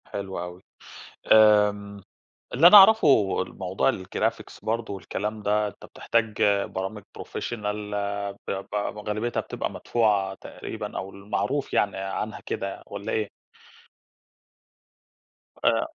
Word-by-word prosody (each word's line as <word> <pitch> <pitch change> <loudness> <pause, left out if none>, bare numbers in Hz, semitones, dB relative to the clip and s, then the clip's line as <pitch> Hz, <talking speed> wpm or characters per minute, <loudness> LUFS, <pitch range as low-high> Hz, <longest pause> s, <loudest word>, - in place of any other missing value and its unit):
حلو 95 -1 -5
أوي. 90 +1 -7 0.7
آمم، 105 -2 +5 0.5
اللي 150 +7 +7
أنا 205 - +10
أعرفه 155 - +6
الموضوع 95 +6 -1
الجرافيكس 110 +1 -3
برضه 110 -1 -3
والكلام 105 +2 -4
ده، 105 +1 +1
أنت 100 - -11
بتحتاج 110 -2 -1 0.2
برامج 95 +2 -5 0.2
professional 105 -3 -4 0.7
ب - - -1 0.2
ب - - -1 0.3
غالبيّتها 110 +3 -1
بتبقى - - -4
مدفوعة 105 -5 +1
تقريبًا، - - -7
أو 95 - -4
المعروف 105 +8 -3
يعني 100 -2 +1
عنها 95 +3 -4
كده 100 0 -4
والَّا 100 0 -6
إيه؟ 105 -2 -1 2.4
آآ - - +3
105 Hz, 110 wpm, -25 LUFS, 100-110 Hz, 2.4 s, أنا